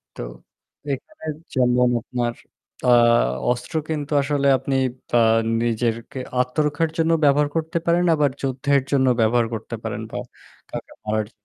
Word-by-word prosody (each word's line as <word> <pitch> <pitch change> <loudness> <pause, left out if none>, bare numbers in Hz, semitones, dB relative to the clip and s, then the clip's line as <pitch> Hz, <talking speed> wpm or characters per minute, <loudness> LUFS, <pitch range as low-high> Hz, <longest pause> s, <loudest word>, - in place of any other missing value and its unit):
তো - - -7 0.7
এখানে 160 - -7 0.3
যেমন 125 -1 +3
আপনার 120 -1 -2 0.5
আ - - +5 0.6
অস্ত্র 125 +5 -4
কিন্তু 150 -1 -3
আসলে 140 0 0
আপনি 135 +1 -2 0.3
বা 120 - +2 0.4
নিজেরকে 115 +3 -1 0.2
আত্মরক্ষার 150 +5 +1
জন্য 165 0 +2
ব্যবহার 145 +1 +4
করতে 160 +1 -1
পারেন 175 +1 +3
আবার 145 -2 +2
যুদ্ধের 135 +1 +1
জন্য 130 -2 +3
ব্যবহার 115 +1 +3
করতে 110 -1 -5
পারেন - - -4
বা - - -4 0.5
কাউকে - - -7
মারার 110 0 0
জ - - -29
135 Hz, 135 wpm, -22 LUFS, 120-150 Hz, 0.7 s, আ